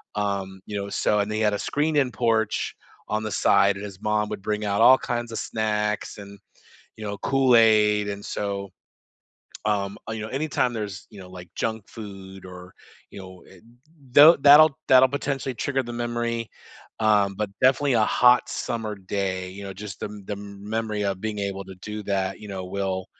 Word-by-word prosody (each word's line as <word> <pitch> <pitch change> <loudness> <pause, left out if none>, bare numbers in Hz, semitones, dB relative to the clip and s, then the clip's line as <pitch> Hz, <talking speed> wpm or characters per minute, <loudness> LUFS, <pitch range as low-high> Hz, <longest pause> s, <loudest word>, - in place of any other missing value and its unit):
um, 100 -2 -3
you 105 - -5
know, 100 0 -4
so 105 +1 +1
and 100 0 -1
they 110 - -2
had 105 -1 +2
a 100 - -2
screened-in 145 -2 +1
porch 110 -1 0 0.4
on 110 0 -1
the 110 - -4
side, 100 0 +3
and 100 - -8
his 100 -1 -10
mom 105 0 0
would - - -5
bring 105 +1 -2
out 100 0 0
all 130 +3 +8
kinds 120 -2 -4
of - - -4
snacks 105 -1 -2
and, 100 -1 -11 0.6
you 110 - -8
know, 100 -1 -4
Kool-Aid, 110 -6 +4
and 100 0 -6
so, 100 -1 -4 1.0
um, 100 -2 -1
uh, - - -3
you 110 -1 -5
know, 110 - -5
anytime 135 -2 -1
there's, 105 -4 -6
you 105 -3 -12
know, 90 -1 -12
like, 90 -1 -11
junk 110 -2 -3
food, 95 -3 -10
or, 90 0 -12 0.4
you - - -10
know, 95 -1 -12
eh, 95 - -17 0.5
though 150 +5 +9
that'll 145 +2 +7
that'll 130 0 +7
potentially 135 -1 -3
trigger 135 +2 -1
the 120 - -7
memory, 120 -1 -3 0.5
um, 105 -2 +3
but 105 -1 -2
definitely 135 +1 +3
a 110 -2 +4
hot 125 +1 +4
summer 110 -2 -3
day, 95 -1 -3
you 100 +2 -9
know, 100 - -6
just 100 -1 -9
the - - -3
m 105 -1 -10
the 105 - -4
memory 105 +2 -4
of 100 -1 -2
being 110 0 -4
able 100 -1 -4
to 95 0 -11
do 105 0 -6
that, 95 0 -2
you 105 - -10
know, 95 -2 -5
will 95 0 -3
105 Hz, 190 wpm, -24 LUFS, 100-115 Hz, 1.0 s, though